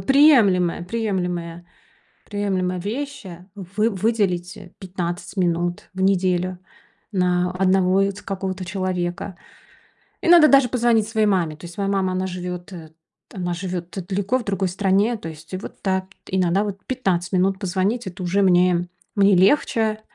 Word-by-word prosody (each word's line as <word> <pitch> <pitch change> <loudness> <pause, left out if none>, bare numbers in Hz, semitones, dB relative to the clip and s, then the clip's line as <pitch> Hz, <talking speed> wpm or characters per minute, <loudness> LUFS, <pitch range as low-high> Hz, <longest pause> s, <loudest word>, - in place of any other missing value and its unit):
приемлемая, 225 - +5
приемлемая, 180 -5 -3 0.6
приемлемая 190 -3 -1
вещь, 270 +5 -5
а. 175 0 -10
Вы 200 +3 -1
выделить 195 -3 0
а 200 -3 -11
15 175 0 -5
минут 175 -1 -1
в 190 - -7
неделю 185 -1 +1 0.5
на 180 -1 +1
одного 185 0 +2
вот 200 +1 -2
какого-то 190 -1 -4
человека. 185 0 -3 0.9
Иногда 340 -3 +7
даже 275 -4 +5
позвонить 235 -3 +2
своей 220 -1 +1
маме. 175 -6 +1
То 150 - -12
есть 170 0 -11
моя 200 -1 -1
мама, 195 -2 +1
она 185 +1 -1
живет, 180 0 -6
э, 160 -3 -10 0.4
она 175 -3 -3
живет 180 0 -5
далеко, 200 +5 0
в 245 - -5
другой 195 -2 0
стране. 200 +5 +1
То 165 - -7
есть 160 +2 -12
вот - - -9
да, 190 -1 0 0.2
иногда 185 +1 +1
вот 200 -2 -5
15 190 -9 -1
минут 190 +1 +2
позвонить- 200 +4 -1
это 185 +1 -7
уже 185 +3 +1
мне 180 -1 +3 0.3
мне 200 -1 +5
легче. 215 +2 +2
190 Hz, 145 wpm, -22 LUFS, 180-205 Hz, 0.9 s, Иногда